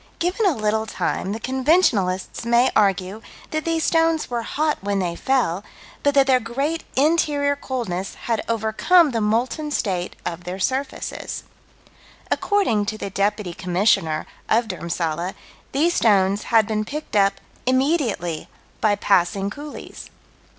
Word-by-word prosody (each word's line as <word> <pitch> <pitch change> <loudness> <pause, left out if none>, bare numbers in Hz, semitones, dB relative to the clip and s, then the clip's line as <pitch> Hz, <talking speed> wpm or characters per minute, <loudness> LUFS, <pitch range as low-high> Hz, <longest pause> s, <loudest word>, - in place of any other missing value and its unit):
Given 365 +5 +1
a 345 - +2
little 220 +1 0
time 195 - -2
the 220 - -3
conventionalists 255 - +1
may 235 +2 +3
argue 195 0 +1 0.3
that 310 0 -2
these 330 -1 0
stones 325 -3 +2
were 240 -1 -1
hot 300 +6 -1
when 200 0 -1
they 175 -3 -1
fell, 205 -6 0 0.4
but 285 0 +2
that 275 -1 +6
their 260 -2 +4
great 275 +8 -2
interior 285 -1 +2
coldness 225 -10 -4
had 230 -2 0
overcome 230 - +3
the 230 -2 -1
molten 240 +8 0
state 185 -10 -2
of 175 +1 -4
their 180 +1 -5
surfaces. 265 +7 -3 0.9
According 305 - +1
to 215 - -2
the 200 - -5
Deputy 200 -1 -1
Commissioner 180 -3 +1 0.2
of 230 +1 +3
Dhurmsalla, 170 -1 -3 0.4
these 320 +6 +2
stones 200 - +3
had 225 -2 +4
been 215 0 -1
picked 295 +5 -6
up 195 -1 +4 0.3
"immediately" 255 - 0 0.3
by 215 -2 +3
passing 195 0 +1
coolies. 290 +4 -9
225 Hz, 135 wpm, -22 LUFS, 195-285 Hz, 0.9 s, that